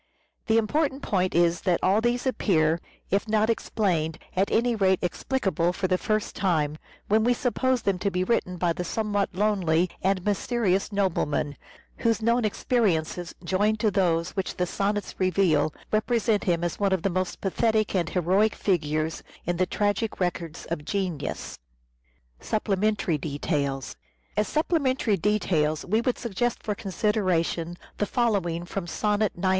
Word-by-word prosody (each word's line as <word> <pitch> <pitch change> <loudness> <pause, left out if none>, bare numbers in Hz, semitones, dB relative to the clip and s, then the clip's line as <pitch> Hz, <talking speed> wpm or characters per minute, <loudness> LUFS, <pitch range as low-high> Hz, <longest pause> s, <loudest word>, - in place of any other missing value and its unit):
The 225 0 +4
important 275 +5 0
point 185 -3 0
is 170 0 +3
that 180 -3 +1
all 200 +4 +4
these 240 +2 0
appear, 165 -10 +2 0.3
if 200 +3 +1
not 215 +1 +3
explained, 170 -8 -1 0.2
at 190 +2 +2
any 235 +1 +2
rate 190 -3 +3
explicable 185 -2 0
for 185 0 -1
the 185 0 +1
first 215 -1 -1
time, 155 -5 0 0.3
when 215 +1 +3
we 245 +1 +3
suppose 255 0 0
them 195 -2 +1
to 200 - 0
be 180 -1 0
written 185 -3 0
by 170 -1 +1
the 180 - -4
somewhat 205 -1 -1
lonely 185 -4 +2
and 190 -1 0
mysterious 205 -1 0
nobleman, 165 -7 0 0.4
whose 230 -2 +1
known 235 +1 +2
experiences 180 -7 0
joined 205 +5 +1
to 215 - +3
those 175 -3 +1
which 190 -2 -3
the 180 - +1
sonnets 200 +3 -2
reveal, 185 -5 +2 0.2
represent 220 0 +1
him 170 -2 +1
as 175 - -2
one 200 -2 +2
of 185 - 0
the 195 - +1
most 185 0 -2
pathetic 215 +2 +1
and 175 -4 +1
heroic 190 +4 +2
figures 155 -4 0 0.2
in 175 0 -1
the 185 +1 +2
tragic 205 +2 -1
records 175 -3 -3
of 150 -3 -2
genius. 180 -4 -3 0.8
As - - -15
supplementary 210 -5 0
details 140 -2 -2 2.0
we 215 +5 +2
would 245 +1 0
suggest 235 +1 -2
for 210 - -1
consideration 185 -5 0 0.2
the 205 - 0
following 190 -9 0
from 180 0 -4
sonnet 210 +3 0
91. 185 +1 +1
195 Hz, 150 wpm, -26 LUFS, 175-215 Hz, 2.0 s, The